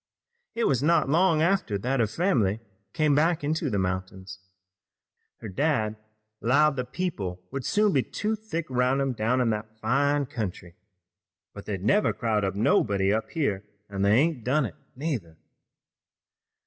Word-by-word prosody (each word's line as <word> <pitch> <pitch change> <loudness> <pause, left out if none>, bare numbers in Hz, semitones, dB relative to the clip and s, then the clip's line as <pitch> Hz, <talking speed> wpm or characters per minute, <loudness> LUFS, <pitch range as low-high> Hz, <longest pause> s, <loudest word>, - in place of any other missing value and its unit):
It 235 - 0
was 130 -3 +2
not 165 -1 +3
long 165 0 +3
after 170 - +1
that 125 +6 -1
her 115 - +3
fam'ly 110 - +1 0.3
came 155 +3 +2
back 160 +2 +2
into 155 0 -1
the 105 - -1
mountains. 95 0 -4 1.0
Her - - -6
dad 110 - 0 0.5
'lowed 145 +5 +3
that 125 0 -4
people 100 - -3
would 135 -1 -4
soon 210 - +2
be 135 - +3
too 215 - -2
thick 205 -7 -5
'roun' 125 +2 +2
him 135 -1 0
down 120 +3 +1
in 120 -2 +2
that 110 +1 -5
fine 140 +5 +1
country, 100 - -5 0.8
but - - -10
they'd 95 -3 -4
never 205 - +3
crowd 105 -5 -1
nobody 100 -2 +2
up 110 +1 -2
here 105 - -1 0.3
an' 100 -1 -3
they 100 +1 +4
ain't 145 -1 +2
done 135 +4 +2
it 100 - -7 0.2
neither." 125 - -4
125 Hz, 155 wpm, -26 LUFS, 105-155 Hz, 1.0 s, they